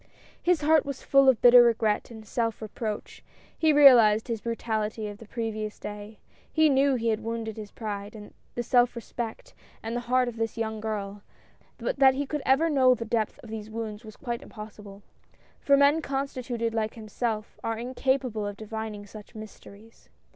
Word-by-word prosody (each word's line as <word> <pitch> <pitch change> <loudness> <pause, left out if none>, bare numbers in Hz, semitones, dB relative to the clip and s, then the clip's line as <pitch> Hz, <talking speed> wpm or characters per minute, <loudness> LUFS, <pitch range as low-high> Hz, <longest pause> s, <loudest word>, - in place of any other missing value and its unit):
His 350 -2 +2
heart 310 0 +4
was 280 -2 -6
full 275 -1 +5
of 255 - +3
bitter 245 0 +9
regret 225 -3 +2
and 220 -2 -11
self 230 +1 -2
reproach; 215 0 -6 0.3
he 315 -1 +3
realized 240 -7 +6
his 225 -2 -2
brutality 220 -2 -3
of 205 0 -8
the 225 - -12
previous 215 -2 -4
day; 210 +1 -8 0.3
he 315 -1 +4
knew 275 0 +3
he 230 -1 0
had 220 0 -1
wounded 225 -1 -4
the 215 -2 -8
pride, 210 -1 -6 0.2
the 240 - -2
self 245 +1 +3
respect, 235 -1 -6 0.3
and 225 +1 -4
the - - 0
heart 255 0 +3
of 235 -1 -5
this 225 0 -3
young 220 -1 -3
girl 205 -2 -4 0.3
— - - -34
but - - -3
that 265 -1 +6
he 285 +1 -1
could 295 +1 -3
ever 270 +5 +4
know 260 -5 +4
the 230 - -6
depth 220 -1 -1
of 225 - -11
these 220 -1 -6
wounds 220 -1 -6
was 215 -1 -12
quite 240 -2 -4
impossible, 210 -5 -11 0.3
— - - -33
for 280 0 +5
men 285 +3 +4
constituted 255 -5 -3
like 220 -1 -2
himself, 220 0 -4
are 225 0 -2
incapable 250 -2 -1
of 205 0 -6
divining 220 -1 -6
such 210 +2 -13
mysteries. 215 0 -13
225 Hz, 185 wpm, -27 LUFS, 215-255 Hz, 0.3 s, bitter